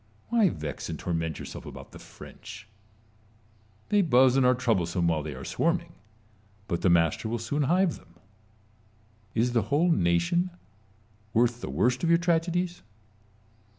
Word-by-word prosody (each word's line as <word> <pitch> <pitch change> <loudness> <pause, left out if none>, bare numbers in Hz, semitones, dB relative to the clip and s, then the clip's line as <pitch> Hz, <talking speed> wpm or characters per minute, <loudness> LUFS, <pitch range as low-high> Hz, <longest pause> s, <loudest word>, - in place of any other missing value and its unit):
Why 225 -5 +4
vex 75 - -6
and - - -4
torment 80 -3 -3
yourself - - -8
about - - -10
the - - -12
French? - - -12 1.2
They 205 -1 +4
buzz 130 -6 +4
and 135 - +4
are 125 - +4
troublesome 90 -8 0
while 80 -2 +1
they 75 -2 -6
are 65 - -8
swarming; 170 0 -1 0.7
but 85 -4 -2
the 95 - +3
master 85 +5 +2
will 120 - -1
soon 120 +6 -2
hive 185 -1 +2
them. 85 -1 -21 1.2
Is 120 +2 +1
the 115 - +3
whole 165 +5 +3
nation 85 - +1 0.9
worth 120 +1 +2
the - - -5
worst 125 +2 +1
of 165 - +2
your 170 - +6
tragedies 175 +1 0
120 Hz, 150 wpm, -27 LUFS, -, 1.2 s, your